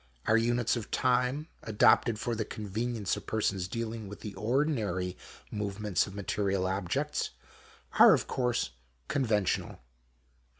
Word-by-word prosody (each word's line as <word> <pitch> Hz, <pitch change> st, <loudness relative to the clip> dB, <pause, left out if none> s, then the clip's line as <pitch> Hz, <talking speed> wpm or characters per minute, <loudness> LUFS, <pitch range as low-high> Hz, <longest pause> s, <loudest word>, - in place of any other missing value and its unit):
Our 110 Hz, -, +4 dB
units 120 Hz, +1 st, +2 dB
of 115 Hz, -3 st, -5 dB
time, 130 Hz, +4 st, +1 dB
adopted 110 Hz, +1 st, +4 dB
for 120 Hz, +2 st, -2 dB
the 110 Hz, 0 st, -1 dB
convenience 110 Hz, +1 st, -2 dB
of -, -, -9 dB
persons 100 Hz, -4 st, 0 dB
dealing 115 Hz, 0 st, -4 dB
with 100 Hz, +1 st, -9 dB
the 105 Hz, -, -6 dB
ordinary 110 Hz, -, 0 dB, 0.4 s
movements 105 Hz, -1 st, -1 dB
of 100 Hz, -, -9 dB
material 100 Hz, -1 st, -1 dB
objects, 100 Hz, +11 st, -1 dB, 0.7 s
are -, -, +10 dB
of -, -, -2 dB
course 120 Hz, -, 0 dB, 0.4 s
conventional. 110 Hz, -8 st, 0 dB
110 Hz, 125 wpm, -30 LUFS, 100-120 Hz, 0.7 s, are